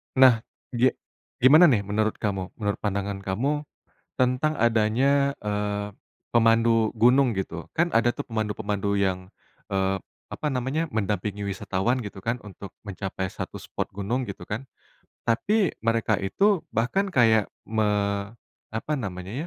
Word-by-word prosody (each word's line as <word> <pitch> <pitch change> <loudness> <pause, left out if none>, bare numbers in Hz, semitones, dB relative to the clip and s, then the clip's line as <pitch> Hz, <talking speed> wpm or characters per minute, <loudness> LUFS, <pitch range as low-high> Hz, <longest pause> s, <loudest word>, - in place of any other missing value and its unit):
Nah, 130 -4 +7 0.3
ge 125 +1 +2 0.5
gimana 155 +7 +8
nih, 115 -9 +3
menurut 110 +2 0
kamu, 95 -3 -3
menurut 105 -2 -2
pandangan 100 -1 -2
kamu, 135 +11 -1 0.5
tentang 125 +4 +2
adanya, 120 +5 +3
eee, 105 0 -2 0.4
pemandu 115 -1 +3
gunung, 125 +3 +4
gitu. 90 -4 -4
Kan 170 +2 +2
ada 120 +1 +3
tuh, - - -7
pemandu-pemandu 105 -2 -2
yang, 95 -1 -1 0.4
eee, 95 0 +1 0.3
apa - - -5
namanya, 130 +6 -1
mendampingi 105 -1 -2
wisatawan, 100 +5 -1
gitu 100 -1 -8
kan, 115 +5 -1
untuk 100 -1 -10
mencapai 95 -1 -4
satu - - -6
spot - - -5
gunung, 115 +6 -3
gitu - - -7
kan. 115 +5 -5 0.6
Tapi, 195 - +2
mereka 115 -2 +2
itu 195 - +1
bahkan 190 - 0
kayak, 110 - +4 0.2
me 110 0 +1 0.9
apa 130 +7 -2
namanya 95 -6 -5
110 Hz, 130 wpm, -25 LUFS, 100-125 Hz, 0.9 s, gimana